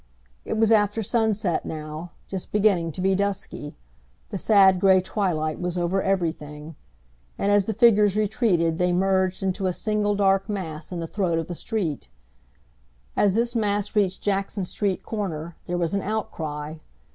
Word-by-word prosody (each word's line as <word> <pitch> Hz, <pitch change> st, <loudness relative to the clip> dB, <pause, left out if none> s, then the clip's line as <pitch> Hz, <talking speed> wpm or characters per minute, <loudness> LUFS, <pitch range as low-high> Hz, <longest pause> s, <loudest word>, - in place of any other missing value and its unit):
It -, -, -2 dB
was 225 Hz, 0 st, +3 dB
after 210 Hz, 0 st, +3 dB
sunset 210 Hz, -5 st, 0 dB
now, 155 Hz, +2 st, -6 dB, 0.2 s
just 190 Hz, -2 st, -6 dB
beginning 195 Hz, -6 st, +2 dB
to 180 Hz, -, -5 dB
be 190 Hz, +1 st, +3 dB
dusky. 195 Hz, -6 st, -3 dB, 0.6 s
The 195 Hz, -, -3 dB
sad 190 Hz, -3 st, +5 dB
gray 190 Hz, 0 st, +5 dB
twilight 175 Hz, -5 st, -1 dB
was 180 Hz, 0 st, -2 dB
over 175 Hz, +2 st, +1 dB
everything, 160 Hz, -5 st, -2 dB, 0.6 s
and 200 Hz, -, +1 dB
as 205 Hz, -1 st, +4 dB
the 220 Hz, -, 0 dB
figures 210 Hz, -3 st, +5 dB
retreated 195 Hz, -7 st, +1 dB
they 180 Hz, 0 st, +2 dB
merged 190 Hz, 0 st, +1 dB
into 190 Hz, 0 st, 0 dB
a 180 Hz, -, 0 dB
single 210 Hz, 0 st, 0 dB
dark 195 Hz, +1 st, +2 dB
mass 170 Hz, -6 st, -5 dB
in 175 Hz, -2 st, -4 dB
the -, -, -3 dB
throat 175 Hz, -3 st, 0 dB
of 165 Hz, -, -2 dB
the 175 Hz, -, -4 dB
street. 175 Hz, -, -3 dB, 1.1 s
As 200 Hz, -2 st, +3 dB
this 235 Hz, +1 st, +1 dB
mass 205 Hz, -1 st, 0 dB
reached 195 Hz, -3 st, +1 dB
Jackson 195 Hz, -1 st, -1 dB
Street 195 Hz, +1 st, -2 dB
corner, 170 Hz, -6 st, -4 dB
there 175 Hz, -, -1 dB
was 170 Hz, 0 st, -1 dB
an 200 Hz, -, +1 dB
outcry. 155 Hz, -8 st, -4 dB
190 Hz, 160 wpm, -24 LUFS, 170-205 Hz, 1.1 s, sad